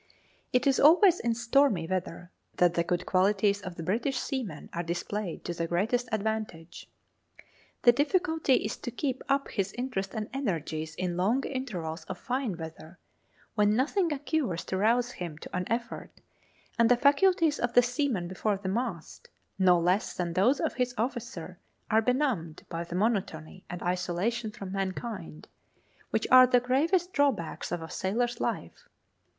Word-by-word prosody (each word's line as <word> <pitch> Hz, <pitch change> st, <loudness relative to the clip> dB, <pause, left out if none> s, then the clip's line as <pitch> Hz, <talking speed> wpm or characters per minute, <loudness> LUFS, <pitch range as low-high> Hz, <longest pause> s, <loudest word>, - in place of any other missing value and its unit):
It 250 Hz, 0 st, +2 dB
is 275 Hz, -2 st, +3 dB
always 350 Hz, +4 st, +6 dB
in 235 Hz, -1 st, 0 dB
stormy 235 Hz, -6 st, +2 dB
weather 180 Hz, 0 st, -4 dB, 0.3 s
that 175 Hz, -1 st, +4 dB
the 170 Hz, -, +1 dB
good 175 Hz, +1 st, -1 dB
qualities 200 Hz, +2 st, +2 dB
of 185 Hz, -3 st, -7 dB
the 165 Hz, -, -6 dB
British 235 Hz, -, 0 dB
seaman 230 Hz, -, -4 dB
are 170 Hz, -, -2 dB
displayed 175 Hz, +2 st, -4 dB
to 175 Hz, -, -2 dB
the 170 Hz, 0 st, -2 dB
greatest 225 Hz, +8 st, 0 dB
advantage. 215 Hz, -6 st, -3 dB, 1.0 s
The 240 Hz, -, +8 dB
difficulty 320 Hz, +1 st, +2 dB
is 210 Hz, -, -2 dB
to -, -, -5 dB
keep 260 Hz, +2 st, -3 dB
up 275 Hz, 0 st, +1 dB
his 195 Hz, -2 st, -2 dB
interest 240 Hz, -7 st, -3 dB
and 215 Hz, -1 st, -3 dB
energies 160 Hz, -, -3 dB
in 180 Hz, -1 st, -2 dB
long 220 Hz, +9 st, +2 dB
intervals 180 Hz, -, -4 dB
of 185 Hz, -, -6 dB
fine 250 Hz, -6 st, -2 dB
weather, 160 Hz, +1 st, -9 dB, 0.6 s
when 210 Hz, 0 st, +3 dB
nothing 325 Hz, -, +1 dB
occurs 285 Hz, -, -1 dB
to 190 Hz, -, -2 dB
rouse 235 Hz, +5 st, +2 dB
him 170 Hz, -9 st, -6 dB
to 160 Hz, -, -9 dB
an 180 Hz, 0 st, -1 dB
effort, 235 Hz, 0 st, -3 dB, 0.7 s
and 230 Hz, -1 st, +5 dB
the 245 Hz, -, +5 dB
faculties 300 Hz, +3 st, +3 dB
of 245 Hz, -1 st, -1 dB
the 245 Hz, -, +7 dB
seaman 245 Hz, -, -1 dB
before 195 Hz, +3 st, -1 dB
the 190 Hz, -1 st, -4 dB
mast, 200 Hz, -5 st, -4 dB, 0.3 s
no 180 Hz, -2 st, +5 dB
less 180 Hz, +4 st, +1 dB
than 175 Hz, -2 st, -2 dB
those 215 Hz, +11 st, +3 dB
of -, -, -1 dB
his 250 Hz, -1 st, -1 dB
officer, 220 Hz, -7 st, -4 dB, 0.3 s
are 220 Hz, +1 st, +5 dB
benumbed 235 Hz, -, -1 dB
by 165 Hz, 0 st, -3 dB
the 170 Hz, 0 st, -7 dB
monotony 185 Hz, -5 st, -2 dB
and 175 Hz, 0 st, -6 dB
isolation 180 Hz, +6 st, -1 dB
from 195 Hz, -2 st, -8 dB
mankind, 195 Hz, -3 st, -5 dB, 0.6 s
which -, -, 0 dB
are 255 Hz, 0 st, +9 dB
the 250 Hz, 0 st, +4 dB
gravest 330 Hz, +9 st, +1 dB
drawbacks 265 Hz, -, 0 dB
of 175 Hz, -2 st, -3 dB
a 160 Hz, -, -8 dB
sailor's 240 Hz, +5 st, -1 dB
life. -, -, -4 dB
215 Hz, 160 wpm, -29 LUFS, 180-250 Hz, 1.0 s, are